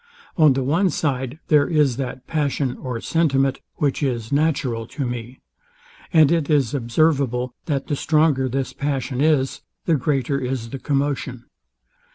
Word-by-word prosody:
On 155 -4 +5
the 130 0 -1
one 165 +9 +2
side 135 -4 -2
there 150 -2 +5
is 150 -7 +2
that 130 -1 -5
passion 145 -4 -1
or 125 -3 -5
sentiment, 135 -5 +1 0.2
which 145 -1 0
is 120 -5 -2
natural 135 -6 0
to 140 +1 -4
me; 120 +1 -6 0.7
and 160 -4 +5
it 165 -4 +1
is 140 -7 +2
observable, 125 -1 +1
that 140 -4 -1
the 145 - -1
stronger 150 -3 +2
this 135 +1 -2
passion 135 -2 -2
is, 145 -4 +2 0.2
the 165 - +2
greater 140 0 0
is 125 -3 -3
the 135 - -5
commotion. 135 -3 -2
135 Hz, 150 wpm, -22 LUFS, 125-150 Hz, 0.7 s, On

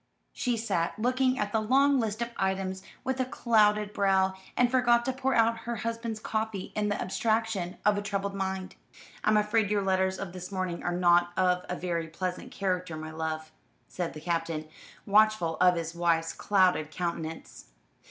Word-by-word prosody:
She 245 -2 -1
sat 190 -7 -1
looking 255 +3 +1
at 205 -1 -1
the 220 - +2
long 270 +5 +4
list 225 0 -1
of 235 - -6
items 190 0 -1 0.2
with 265 0 -2
a 255 - +2
clouded 210 -5 +2
brow, 190 -1 +2 0.2
and 245 -1 +3
forgot 240 -2 +3
to 260 - 0
pour 265 +1 0
out 230 0 +3
her 235 - -1
husband's 230 0 -3
coffee 215 -3 -3
in 210 -1 0
the 205 - -1
abstraction 215 -2 -1
of 210 -1 +4
a - - -3
troubled 200 -1 -2
mind. 190 -1 -3 0.5
"I'm 215 0 +4
afraid 210 0 +2
your 205 -1 +1
letters 190 0 +1
of 185 -3 -6
this 180 +1 -7
morning 185 -3 -3
are 175 - -1
not 175 0 +4
of 180 -1 +2
a 180 - -1
very 170 -2 -2
pleasant 180 +3 -4
character, 180 -4 -2
my 155 0 -6
love," 160 0 -4 0.4
said 175 -2 -4
the 155 - -9
Captain, 165 -2 -2 0.4
watchful 210 -5 +3
of 180 -1 +5
his 165 -1 -3
wife's 170 -1 +1
clouded 185 -6 +2
countenance. 165 - -5
195 Hz, 175 wpm, -29 LUFS, 175-220 Hz, 0.5 s, of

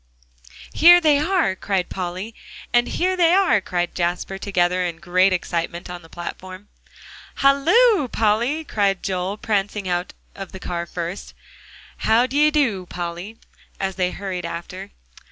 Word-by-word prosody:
"Here 350 +2 +8
they 305 -4 +3
are!" 330 - +1
cried 190 -1 -1
Polly, 185 +4 -5 0.4
and 240 0 +4
"Here 370 +1 0
they 345 -1 +4
are!" 380 - +3
cried 175 -2 -2
Jasper, 180 +2 -2
together, 180 -2 +1
in 170 -2 -3
great 185 +2 +2
excitement, 175 0 -3
on 175 -1 -7
the 165 - -17
platform. 185 +3 -8 0.7
"Halloo, 320 - +4
Polly!" 235 +8 0
cried 200 -8 0
Joel, 190 +1 -2
prancing 205 -2 -2
out 175 0 -2 0.2
of 195 -1 -9
the 190 - -8
car 170 -1 -4
first, 175 +3 -6 0.6
and - - -5
"How 230 +3 +5
d'ye 290 +4 +3
do, 235 - 0
Polly?" 175 +5 -6 0.4
as 190 -1 -2
they 180 -1 +1
all - - -6
hurried 185 -3 -5
after. 170 +2 -7
195 Hz, 150 wpm, -22 LUFS, 180-255 Hz, 0.7 s, Here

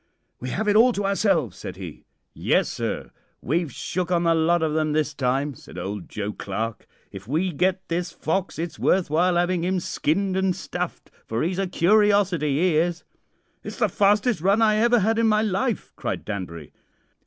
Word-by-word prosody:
"'We 125 - -5
have 215 +10 -2
it 205 - +3
all 240 +3 +6
to 200 -1 -2
ourselves,' 195 - +1
said - - -7
he. - - -9 0.3
"'Yes, - - +1
sir, - - -4 0.3
we've 160 +2 -1
shook 180 +7 -3
on 175 -1 +2
the 165 -1 +4
lot 165 +1 +2
of 155 -1 0
'em 155 -1 +1
this 150 -1 0
time,' 135 +1 0
said 110 - -13
old 95 +1 -5
Joe 105 0 -4
Clarke. 110 +3 -4 0.2
'If 95 +1 -10
we 165 +8 0
get 185 +4 0
this 175 +1 -2
fox 175 +4 -2
it's 165 0 -5
worth 185 -5 +2
while 175 +3 +3
'aving 175 0 +1
'im 185 +1 0
skinned 185 +3 -1
an' 190 -1 +1
stuffed, 180 -1 -5 0.2
for 115 +1 -1
'e's 180 +3 -1
a 195 - 0
curiosity 195 -3 +3
'e 155 +4 +2
is.' 175 +1 0 0.6
"'It's - - -7
the 220 -4 +2
fastest 205 +1 +2
run 195 +4 +3
I 215 -2 +4
ever 235 +1 +4
had 225 +3 +1
in 230 - +3
my 215 0 +3
life!' 210 +2 -1
cried - - -4
Danbury. 90 -7 -6
175 Hz, 190 wpm, -24 LUFS, 150-195 Hz, 0.6 s, all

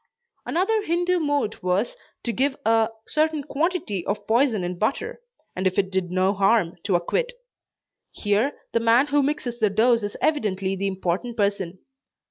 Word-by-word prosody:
Another 425 +6 +1
Hindoo 355 0 +1
mode 290 -8 -1
was, 185 +5 0 0.3
to 235 - -2
give 270 +5 +1
a 225 0 +4 0.2
certain 310 -1 +1
quantity 295 - -1
of 205 0 -2
poison 230 -3 +2
in 175 0 -4
butter, 435 - -1 0.3
and 185 +1 +1
if 185 - -2
it 190 -1 +1
did 190 -2 -1
no 185 +2 +2
harm, 195 -3 +2
to 195 -3 +2
acquit. 475 - 0 0.8
Here, 210 +7 0 0.2
the 230 - +3
man 230 +4 +4
who 290 0 +2
mixes 265 -4 -2
the 215 -2 +3
dose 230 +3 +3
is 205 0 -4
evidently 195 -10 0
the 195 +1 -1
important 190 +5 -2
person. 200 -3 -1
220 Hz, 160 wpm, -24 LUFS, 195-290 Hz, 0.8 s, a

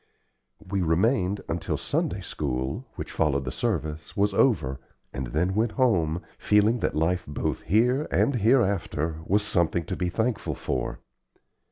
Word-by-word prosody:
We 95 +1 -1
remained 95 +4 +2
until 80 0 -2
Sunday - - -1
school, 70 - -3
which - - -6
followed 70 -4 +1
the 65 - -3
service, 75 0 -3
was 100 0 +2
over, 80 - +2 0.3
and 65 -2 -3
then 85 +9 0
went 110 +2 +1
home, 85 - +2 0.2
feeling 105 +3 +3
that - - -1
life 85 +4 +1
both 75 - -2
here 125 - +2
and 140 -3 +2
hereafter 100 - +1
was 105 +2 +3
something 85 -4 +1
to - - -3
be 90 - -1
thankful 110 +4 -1
for. - - -3
90 Hz, 145 wpm, -26 LUFS, 80-110 Hz, 0.3 s, feeling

